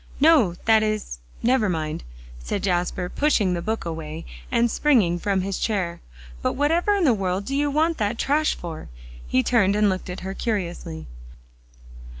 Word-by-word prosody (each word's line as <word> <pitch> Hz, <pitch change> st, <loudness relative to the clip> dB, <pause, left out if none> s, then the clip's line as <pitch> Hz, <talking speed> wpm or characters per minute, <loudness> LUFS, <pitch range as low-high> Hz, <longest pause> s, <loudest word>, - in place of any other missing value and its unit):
"No 275 Hz, -, +5 dB
that 220 Hz, -1 st, +5 dB
is 215 Hz, -, -2 dB, 0.2 s
never 240 Hz, -4 st, +3 dB
mind," 155 Hz, -, -3 dB, 0.4 s
said 190 Hz, -, -3 dB
Jasper, 180 Hz, -1 st, 0 dB
pushing 210 Hz, -6 st, +1 dB
the 170 Hz, -, -2 dB
book 220 Hz, +2 st, -3 dB
away 160 Hz, -1 st, -5 dB, 0.3 s
and 235 Hz, -1 st, +2 dB
springing 210 Hz, -, +3 dB
from 195 Hz, 0 st, 0 dB
his 195 Hz, 0 st, -3 dB
chair. 180 Hz, -6 st, -1 dB, 0.4 s
"But -, -, 0 dB
whatever 330 Hz, +8 st, +2 dB
in 395 Hz, -, +1 dB
the 270 Hz, -7 st, +5 dB
world 195 Hz, -1 st, -1 dB
do 275 Hz, -, -3 dB
you 290 Hz, +1 st, +1 dB
want 315 Hz, +3 st, +1 dB
that 210 Hz, +2 st, 0 dB
trash 300 Hz, +5 st, +1 dB
for?" 165 Hz, -3 st, -7 dB, 0.4 s
He 130 Hz, -, +2 dB
turned, 205 Hz, -5 st, +3 dB
and 210 Hz, -1 st, +3 dB
looked 185 Hz, 0 st, -3 dB
at 180 Hz, -, -6 dB
her 190 Hz, +1 st, -4 dB
curiously. 175 Hz, -, -3 dB
200 Hz, 165 wpm, -24 LUFS, 175-255 Hz, 0.4 s, No